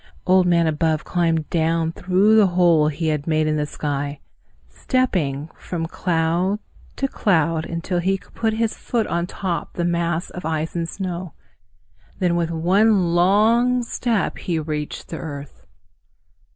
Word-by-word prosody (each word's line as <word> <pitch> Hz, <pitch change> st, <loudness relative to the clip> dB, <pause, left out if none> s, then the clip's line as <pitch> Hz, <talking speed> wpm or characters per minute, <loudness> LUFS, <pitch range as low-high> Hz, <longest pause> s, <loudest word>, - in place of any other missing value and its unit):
Old 185 Hz, -1 st, +4 dB
Man 170 Hz, -1 st, +3 dB
Above 155 Hz, 0 st, 0 dB
climbed 165 Hz, -3 st, 0 dB
down 165 Hz, 0 st, +1 dB
through 190 Hz, +5 st, +3 dB
the 215 Hz, -3 st, +6 dB
hole 175 Hz, -4 st, +4 dB
he 160 Hz, +2 st, -1 dB
had 150 Hz, -1 st, -2 dB
made 155 Hz, -1 st, +2 dB
in 155 Hz, 0 st, +1 dB
the 150 Hz, -1 st, -1 dB
sky, 145 Hz, -1 st, -3 dB, 0.5 s
stepping 165 Hz, -, -1 dB
from 165 Hz, -2 st, -4 dB
cloud 170 Hz, +3 st, 0 dB, 0.4 s
to 275 Hz, -, -1 dB
cloud, 165 Hz, -, +1 dB
until 170 Hz, +1 st, -2 dB
he 190 Hz, +3 st, +1 dB
could -, -, -22 dB
put 225 Hz, -1 st, 0 dB
his 225 Hz, 0 st, 0 dB
foot 230 Hz, -3 st, -1 dB
on 170 Hz, +1 st, -1 dB
top 180 Hz, -2 st, -4 dB
the 175 Hz, -, -2 dB
mass 170 Hz, -1 st, -1 dB
of 180 Hz, -, -7 dB
ice 160 Hz, 0 st, -2 dB
and 165 Hz, -1 st, -2 dB
snow. 180 Hz, -4 st, -5 dB, 0.8 s
Then 180 Hz, -2 st, +1 dB
with 170 Hz, -1 st, 0 dB
one 180 Hz, +2 st, +3 dB
long 225 Hz, +8 st, +3 dB
step 230 Hz, -2 st, -1 dB
he 170 Hz, -3 st, -2 dB
reached 150 Hz, -1 st, -4 dB
the 165 Hz, -, -5 dB
earth. 145 Hz, -7 st, -8 dB
170 Hz, 150 wpm, -22 LUFS, 160-190 Hz, 0.8 s, the